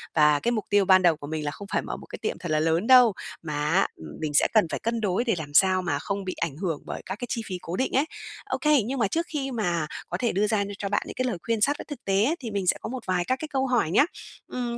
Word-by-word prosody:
Và 150 -1 +5
cái 240 - 0
mục 215 -4 -1
tiêu 205 -1 +4
ban 185 0 +6
đầu 170 -3 +4
của 145 - -8
mình 155 0 -3
là 145 - -1
không 200 +6 -9
phải - - +1
mở - - -5
một - - -12
cái - - -8
tiệm - - -2
thật 175 -3 -5
là 155 - +3
lớn 165 +6 +1
đâu, 250 -4 +7 0.3
mà 155 -2 -5 0.2
á, 190 +3 +3
ừm, 80 - -11
mình 155 -2 -2
sẽ 145 - +5
cần 215 -5 +5
phải - - -2
cân 230 0 -2
đối 200 +3 +1
để 230 -5 +1
làm 145 -2 -7
sao 185 +2 +5
mà 145 -6 -1
không 200 +5 -3
bị 185 - -2
ảnh 160 -5 -2
hưởng 165 -4 -2
bởi - - -6
các 190 - -4
cái 245 - -4
chi 235 - -2
phí 185 -3 -4
cố 170 - -5
định 260 - 0
ấy. 275 +4 +3 0.4
Ô - - -2
kê, 300 -4 +4
nhưng 265 +2 -3
mà 215 - +3
trước 330 +11 -1
khi 275 -3 -3
mà 175 -9 -1 0.2
có - - -2
thể 240 -2 0
đưa 205 +3 +1
ra 210 -1 +1
nh - - -5
cho 200 - -3
bạn 205 - +1
những - - -7
cái 255 - -1
lời 235 -8 -1
khuyên 230 -2 -1
sát 290 +5 +3
với - - -8
thực 290 - -9
tế 195 +1 +2
ấy, 310 +6 +1
thì 235 -4 -6
mình 200 -3 -2
sẽ - - +4
có - - -5
một 255 -1 -6
vài 180 -1 0
các 255 +5 0
cái 310 - -5
câu 270 -2 -1
hỏi 240 -11 +1
nhá. 250 - +5 0.4
Ừm, 240 -1 -3
200 Hz, 320 wpm, -26 LUFS, 170-245 Hz, 0.4 s, đâu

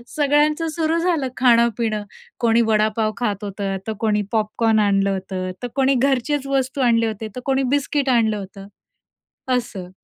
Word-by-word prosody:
सगळ्यांचं 300 +2 +2
सुरू 325 0 +1
झालं, 330 -6 0
खाणं-पिणं 235 -3 +2 0.4
कोणी 235 -1 +3
वडापाव 215 0 +1
खात 210 -4 -2
होतं, 195 -1 -3
तर 220 - -1
कोणी 210 -2 +1
पॉपकॉर्न 220 0 +1
आणलं 200 -1 +2
होते, 185 -1 -4
तर 245 - -1
कोणी 270 0 +3
घरचेच 275 +2 0
वस्तू 270 0 -1
आणल्या 230 -2 +3
होत्या, 220 0 -6
तर 250 - -5
कोणी 270 0 +1
बिस्किट 280 -1 -1
आणलं 225 -4 +2
होतं. 195 0 -9 0.9
असं. 195 -7 -6
230 Hz, 150 wpm, -21 LUFS, 210-270 Hz, 0.9 s, कोणी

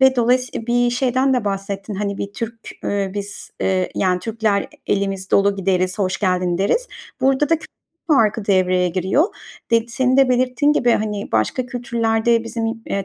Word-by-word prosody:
ve 265 -1 +5
dolayısıy 245 -1 +1
Bir 240 0 +2
şeyden 260 +1 +1
de 245 - 0
bahsettin. 195 +1 -3
Hani, 200 0 -3
bir 200 - -4
Türk, 230 +1 -5 0.3
eee, 200 -1 -1
biz, 205 0 -6
eee, 185 -1 0
yani, 180 -1 +1
Türkler 220 -1 0
e - - -10 0.2
elimiz 195 -1 -1
dolu 200 0 +3
gideriz, 185 0 0
hoş 190 -1 0
geldin 180 -3 0
deriz. 470 - +1 0.3
Burada 270 +3 +2
da 330 - +4
kültür 315 - -12 0.4
farkı 225 -7 +3
devreye 185 -2 +2
giriyor. 190 - +1 0.5
De 230 0 +3
senin 255 +2 +1
de 270 -1 +5
belirttiğin 255 +4 +2
gibi, 245 -4 +2
hani, 210 -1 -2
başka 110 - 0
kültürlerde 230 -1 0
bizim 230 0 -3
yi 225 - -1
eee, 195 -1 -2
220 Hz, 175 wpm, -20 LUFS, 195-245 Hz, 0.5 s, ve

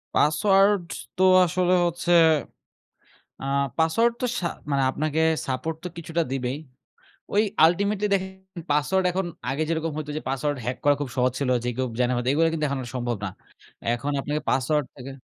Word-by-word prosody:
Password 195 +5 +4 0.3
তো 185 - +3 0.2
আসলে 180 +1 +1
হচ্ছে, 175 +1 -2 1.3
আ - - -5 0.3
পাসওয়ার্ড 195 +9 +3
তো 250 - +1
শা 175 - -2 0.2
মানে 140 -1 +2
আপনাকে 155 +3 -1 0.3
support 145 +5 -2
তো - - -2
কিছুটা 170 0 -2
দিবেই। 130 +1 -2 0.8
ওই 210 - +5 0.2
ultimately 200 +5 +2
দেখেন 190 -1 -5
পাসওয়ার্ড 150 +6 +2
এখন 190 +1 -1 0.2
আগে 140 +4 -1
যেরকম 165 -1 -1
হইতো 150 -1 -5
যে - - -10
পাসওয়ার্ড 140 +2 -1
হ্যাক 125 +2 -2
করা 145 - +5
খুব 140 -4 -3
সহজ 125 0 +2
ছিল। 140 -3 0
যে - - -1
কেউ 130 0 0
জাইনা 125 0 +2
ফেলতো 120 +1 -1
এগুলো 165 +3 +3
কিন্তু 155 -2 -1
এখন 140 0 -2
আর - - -8
সম্ভব 120 -1 -2
না। - - -1 0.7
এখন 130 +5 -3
আপনাকে 145 +2 -2
পাসওয়ার্ড 145 +3 +1
থাকে। 135 0 -9
155 Hz, 170 wpm, -25 LUFS, 135-180 Hz, 1.3 s, ওই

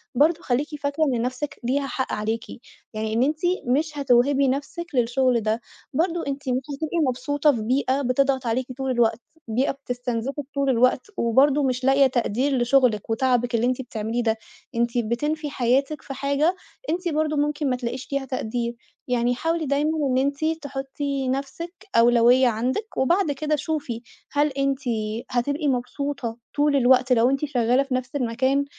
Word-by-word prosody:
برضه 315 +6 +3
خليكِ 265 +2 0 0.2
فاكرة 285 +2 0
إن 255 -6 +1
نفسِك 255 +4 -3
ليها 275 +3 0
حق 260 +1 -3
عليكِ، 220 +2 -2 0.5
يعني 215 0 -2
إن 235 +3 +3
أنتِ 300 +3 0 0.3
مش 295 +4 0
هتوهبي 275 +1 +3
نفسِك 290 +6 -2
للشغل 245 0 +2
ده، 220 +2 -1 0.3
برضه 335 +4 0
أنتِ 275 -1 -3
مش 255 +1 +1
هتبقي 315 +4 -3
مبسوطة 285 +4 +1
في 235 -6 -3
بيئة 260 +4 +1
بتضغط 265 0 +1
عليكِ 250 +3 0
طول 265 -1 -1
الوقت، 235 -2 +2 0.3
بيئة 245 +5 +1
بتستنزفِك 250 0 -4
طول 280 -1 +1
الوقت، 255 +1 +3
وبرضه 270 +5 +3
مش 255 -1 -1
لاقية 270 +1 +5
تقدير 255 +2 0
لشغلِك 240 -4 +2
وتعبِك 245 0 +1
اللي 230 +1 +2
أنتِ 255 +1 0
بتعمليه 230 -1 -3
ده، 225 -1 +1 0.4
أنتِ 235 +1 0
بتنفي 295 +7 -1
حياتِك 275 +3 +1
في 275 - -7
حاجة 280 +6 +1 0.3
أنتِ 350 +1 -1
برضه 305 -1 0
ممكن 295 0 0
ما 250 - +1
تلاقيش 250 +1 -4
فيها 275 -1 -2
تقدير، 240 -2 -3 0.3
يعني 245 0 +1
حاولي 325 +4 -1
دايمًا 285 +2 +1 0.2
إن 255 - +1
أنتِ 280 +3 0 0.2
تحطّي 275 0 -3
نفسِك 280 +6 -4 0.2
أولوية 240 +2 +5
عندِك 260 - -2
وبعد 340 +5 +2
كده 305 +2 0
شوفي، 295 -6 -3 0.3
هل 290 +1 +3
أنتِ 275 -1 -1 0.5
هتبقي 285 +5 0
مبسوطة 250 -2 -2 0.2
طول 290 0 +3
الوقت 255 -1 +4
لو 240 +1 +4
أنتِ 275 +2 0
شغالة 250 -1 +2
في 275 -2 -5
نفس 255 +1 -4
المكان، 260 +2 +1
265 Hz, 160 wpm, -24 LUFS, 245-285 Hz, 0.5 s, لاقية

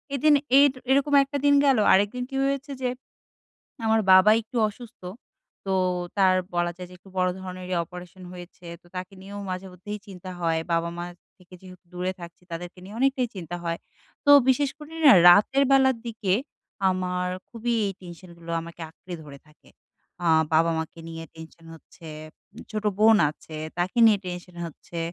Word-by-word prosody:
এদিন 300 +3 +4 0.3
এর 285 -1 +6 0.2
এরকম 280 +2 +2
একটা 280 +1 -4
দিন 285 0 +5
গেল। 270 -4 +4 0.2
আরেকদিন 205 +6 +2
কি 270 - -7
হয়েছে 275 +1 -2
যে 250 - 0 1.0
আমার 220 0 +3
বাবা 190 +3 +7
একটু 230 +3 -11
অসুস্থ। 230 0 -13 0.6
তো 195 - -1 0.5
তার 190 -1 +5 0.2
বলা 175 0 0
যায় 180 0 -8
যে - - -12
একটু 195 - -19
বড় 185 0 +3
ধরনেরই 185 0 -6
অপারেশন 180 +2 -12
হয়েছে। 175 0 -12 0.2
তো - - -23
তাকে 185 +1 -6
নিয়েও 200 +1 -8
মাঝেমধ্যেই 185 +2 -7
চিন্তা 185 -1 -10
হয়। 165 -1 0
বাবা-মার 170 +1 -2 0.3
থেকে 180 0 -17
যেহেতু 185 -1 -14
দূরে 180 +1 -2
থাকছি, 170 +1 -11
তাদেরকে 175 +2 -7
নিয়ে 205 +4 -10
অনেকটাই 265 -2 +1
চিন্তা 175 -1 -6
হয়। 170 0 -2 0.5
তো 285 - +4 0.2
বিশেষ 265 +2 +3
করে 300 +1 -12
না - - +10 0.2
রাতের 215 +10 +5
বেলার 265 -2 +4
দিকে 220 -4 -2 0.6
আমার 180 0 -2 0.2
খুবই 235 +1 -2
এই 195 - -2
টেনশনগুলো 170 -1 -12
আমাকে 170 +1 -11
আঁকড়ে 180 +1 -10
ধরে 140 -1 -11
থাকে। 150 - -23 0.5
আ - - 0 0.3
বাবা-মাকে 165 +1 0
নিয়ে 165 0 -7
টেনশন 165 +1 -13
হচ্ছে। 165 +1 -15 0.5
উম - - -10
ছোট 215 -1 -4
বোন 220 +1 +6
আছে, 155 0 -12 0.2
তাকে 180 +6 -1
নিয়ে 210 -2 +5
টেনশন 180 0 -7
হচ্ছে। 170 +1 -10
185 Hz, 160 wpm, -25 LUFS, 175-225 Hz, 1.0 s, না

